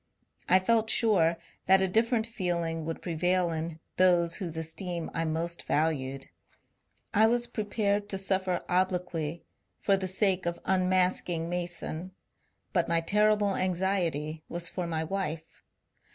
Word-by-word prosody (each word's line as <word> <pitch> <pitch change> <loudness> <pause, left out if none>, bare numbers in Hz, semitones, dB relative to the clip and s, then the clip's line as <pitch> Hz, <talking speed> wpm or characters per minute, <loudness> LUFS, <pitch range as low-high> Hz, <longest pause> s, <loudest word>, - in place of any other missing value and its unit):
I 185 - +7
felt 220 +3 +2
sure 185 -8 +3 0.3
that 190 0 +7
a - - +3
different 225 +3 +2
feeling 170 -7 -2
would 165 0 -5
prevail 175 +1 +1
in 160 0 -4 0.2
those 175 -2 +4
whose 170 -4 -5
esteem 170 +1 -4
I 165 - -1
most 165 +2 -2
valued; 135 -4 0 0.9
I 220 +2 +5
was 240 +1 +2
prepared 205 -2 -1
to 195 - -1
suffer 190 -2 0
obloquy 180 -3 -1 0.3
for 200 - +2
the 190 -1 -3
sake 190 -1 +1
of 170 0 -2
un 185 -1 +2
masking 180 -2 +1
Mason; 175 0 -3 0.6
but 175 -3 +2
my 165 0 +2
terrible 210 +2 +2
anxiety 175 -5 -1
was 175 0 -2
for 180 -2 -4
my 160 -1 -1
wife. 165 -2 -4
180 Hz, 140 wpm, -29 LUFS, 165-195 Hz, 0.9 s, I